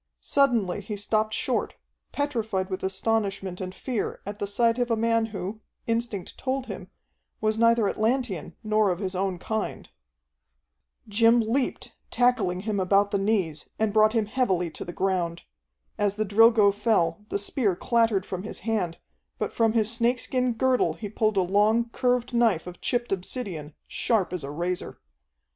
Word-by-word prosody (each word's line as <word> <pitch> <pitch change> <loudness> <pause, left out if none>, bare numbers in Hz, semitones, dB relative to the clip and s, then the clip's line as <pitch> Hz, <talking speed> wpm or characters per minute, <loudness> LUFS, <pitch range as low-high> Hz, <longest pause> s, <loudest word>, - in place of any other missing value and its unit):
Suddenly 240 -10 +2
he 210 - -5
stopped 215 +2 0
short, - - -1 0.4
petrified 220 -10 -2
with 185 - -3
astonishment 195 -1 -1
and 185 0 -4
fear 245 -5 -3
at 205 +1 -6
the 200 - -2
sight 230 +3 +2
of 245 0 0
a 230 - +3
man 230 0 +1
who, 205 +1 -6 0.2
instinct 230 -5 -3
told 265 0 -2
him, - - -8 0.5
was 215 0 0
neither 230 -2 +4
Atlantean 220 - -1
nor 215 -1 +2
of 180 - 0
his 190 0 -3
own 190 0 -1
kind. 220 +4 -4 1.2
Jim 230 +3 +4
leaped, 235 +4 -1 0.2
tackling 220 -8 +2
him 210 -1 -2
about 200 +2 +3
the 200 - +1
knees, 190 -7 -1
and 215 -1 0
brought 215 0 +5
him 225 -3 +2
heavily 190 -8 0
to - - -6
the 175 - -6
ground. 175 -2 -1 0.6
As 205 -1 +1
the 215 +1 -1
Drilgo 215 0 +5
fell, 205 -4 +1
the - - 0
spear 200 -1 0
clattered 225 -2 +1
from 185 -1 -4
his 210 - -7
hand, 195 -6 -1 0.4
but - - -2
from 225 -1 +2
his 220 -1 +2
snakeskin 245 +1 +1
girdle 255 +2 +2
he 210 - -7
pulled 215 0 0
a 190 - +4
long, 210 +5 +2
curved 250 0 0
knife 230 -8 +2
of 180 0 -10
chipped 240 -1 -1
obsidian, 180 - -3
sharp 210 -6 0
as 180 -5 -3
a 140 - -5
razor. 175 +4 -3
215 Hz, 160 wpm, -26 LUFS, 190-230 Hz, 1.2 s, brought